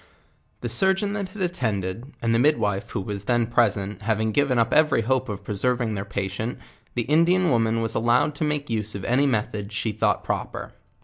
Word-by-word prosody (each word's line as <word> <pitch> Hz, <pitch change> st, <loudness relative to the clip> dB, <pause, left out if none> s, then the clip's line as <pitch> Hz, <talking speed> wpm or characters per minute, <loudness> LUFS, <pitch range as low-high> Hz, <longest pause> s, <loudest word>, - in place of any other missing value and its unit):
The 120 Hz, -, -2 dB
surgeon 190 Hz, -, +2 dB
tint 200 Hz, -3 st, -3 dB
had 190 Hz, 0 st, -5 dB
attended, 115 Hz, -, -2 dB
and 115 Hz, 0 st, +2 dB
the 115 Hz, -, +3 dB
midwife 110 Hz, -8 st, +1 dB
who -, -, -3 dB
was 100 Hz, 0 st, -5 dB
then 120 Hz, 0 st, +2 dB
present, 105 Hz, -4 st, +1 dB
having 110 Hz, 0 st, 0 dB
given 140 Hz, +1 st, +2 dB
up 115 Hz, -1 st, +2 dB
every 155 Hz, -5 st, +4 dB
hope 130 Hz, +1 st, 0 dB
of 100 Hz, -2 st, -5 dB
preserving 120 Hz, +2 st, 0 dB
1 100 Hz, -1 st, -3 dB
iheir -, -, -21 dB
patient, 100 Hz, +4 st, -3 dB, 0.4 s
the 120 Hz, -, 0 dB
Indian 170 Hz, +5 st, +3 dB
woman 115 Hz, -1 st, +2 dB
was 115 Hz, 0 st, 0 dB
allowed 120 Hz, +6 st, +2 dB
to 145 Hz, -, -3 dB
make 150 Hz, -1 st, -1 dB
use 110 Hz, -2 st, -2 dB
of 100 Hz, -, -5 dB
any 135 Hz, +4 st, +3 dB
methods 105 Hz, -3 st, -2 dB
she 110 Hz, -, -1 dB
thought 105 Hz, -, 0 dB
proper. -, -, -4 dB
115 Hz, 195 wpm, -24 LUFS, 105-145 Hz, 0.4 s, every